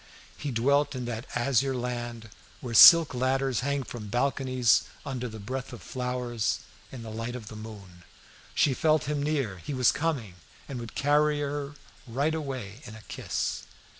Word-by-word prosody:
He 145 - -5
dwelt 140 +4 +2
in 125 -1 -4
that 120 0 -5
azure 130 +2 +1
land 120 -2 -4 0.3
where 120 -2 -6
silk 165 +6 +10
ladders 130 0 0
hang 140 +1 -1
from 115 -4 -8
balconies 130 +1 +2 0.2
under 125 -3 -4
the 110 - -9
breath 130 +5 -5
of 120 - -10
flowers, 125 -3 -2 0.3
in 125 -3 -8
the 110 - -7
light 115 +2 -4
of 115 -4 -8
the 110 - -9
moon. 100 -5 -11 0.5
She 140 - +3
felt 155 +2 +2
him 150 0 -2
near 145 -3 0
her; 95 - -10
he 140 +11 -5
was 125 -2 +4
coming, 130 - -2 0.3
and 130 -3 -5
would 115 -1 -8
carry 150 +1 +3
her 145 0 -3 0.3
right 140 +7 0
away 130 -8 -5
in 110 -2 -9
a 110 - -12
kiss. - - -3
125 Hz, 170 wpm, -28 LUFS, 115-140 Hz, 0.5 s, silk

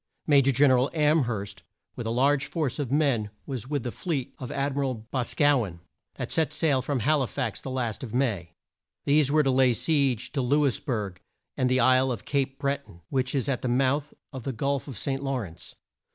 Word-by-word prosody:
Ma 145 -2 +5
jor 140 0 +5
Gen 135 +2 +4
er 130 - +5
al 130 - +1
Am 150 -2 +3
herst 100 -4 -4 0.3
with 115 - -5
a - - -1
large 135 +4 +2
force 155 -5 -2
of 135 -4 -2
men 135 -8 +2 0.2
was 125 -4 -5
with 145 -3 -2
the 120 - -3
fleet 150 -5 -3
of 125 - -6
Ad 140 0 -1
mi 140 - -2
ral 135 -2 0
Bos 120 +3 -3
caw 145 -4 +4
en, 85 -4 -8 0.4
that - - -5
set 160 -2 +1
sail 155 -4 +2
from 135 -1 -2
Hal 150 +4 +3
i 130 - 0
fax 125 -6 -3
the - - -6
last 125 -3 -2
of 120 - -6
May. 105 -10 -1 0.5
These 145 -1 +3
were 155 0 +4
to 135 - +2
lay 130 -1 +4
siege 135 -5 +1
to 140 - -1
Lou 145 +4 +2
is 130 - +1
berg 105 - -3 0.3
and 130 - +1
the 130 0 +3
isle 130 +1 +4
of 120 - -5
Cape 135 -1 -1
Bre 140 0 0
ton, 85 - -17
which 130 0 0
is 135 0 0
at 135 -3 -1
the - - -2
mouth 135 +4 +1 0.2
of 130 - -5
the 135 +3 -4
Gulf 140 +4 -1
of 130 -6 -7
St. 135 +4 -1
Law 135 -1 -1
rence. 90 -9 -7
130 Hz, 235 wpm, -27 LUFS, 120-140 Hz, 0.5 s, Ma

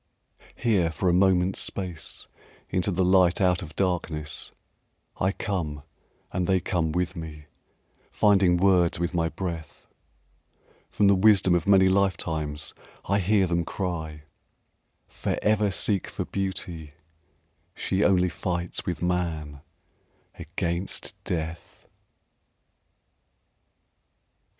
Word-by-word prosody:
Here 100 -8 +2
for 90 +3 0
a - - +3
moment's 95 0 +3
space 90 -4 -4 0.4
Into 90 +2 +1
the 95 -1 +1
light 90 -1 +4
out 90 -2 +2
of 80 -3 -9
darkness, 80 -5 -2 0.7
I 95 - +1
come 80 -9 -3 0.5
and 90 -1 -1
they 95 -1 +3
come 85 -3 -1
with 90 +1 -1
me 80 -3 -8 0.7
Finding 95 -4 +4
words 90 -2 +3
with 85 +1 -2
my 85 -1 +1
breath; 85 -3 -6 1.0
From 105 - +1
the 100 - +6
wisdom 95 -2 +5
of 85 +1 +1
many 95 -1 +6
life 95 0 +2
times 80 -1 -3 0.3
I 100 +1 +1
hear 100 +1 +3
them 85 -1 0
cry: 80 -5 -4 0.8
"Forever 105 -1 0
Seek 100 0 +1
for - - -4
Beauty, 90 -6 -4 0.8
she 95 +2 0
only 90 -2 +3
Fights 85 +1 -3
with 90 -2 -3
man 80 -5 -2 0.7
against 85 +3 -3
Death!" 80 -1 -5
90 Hz, 110 wpm, -26 LUFS, 80-95 Hz, 1.0 s, the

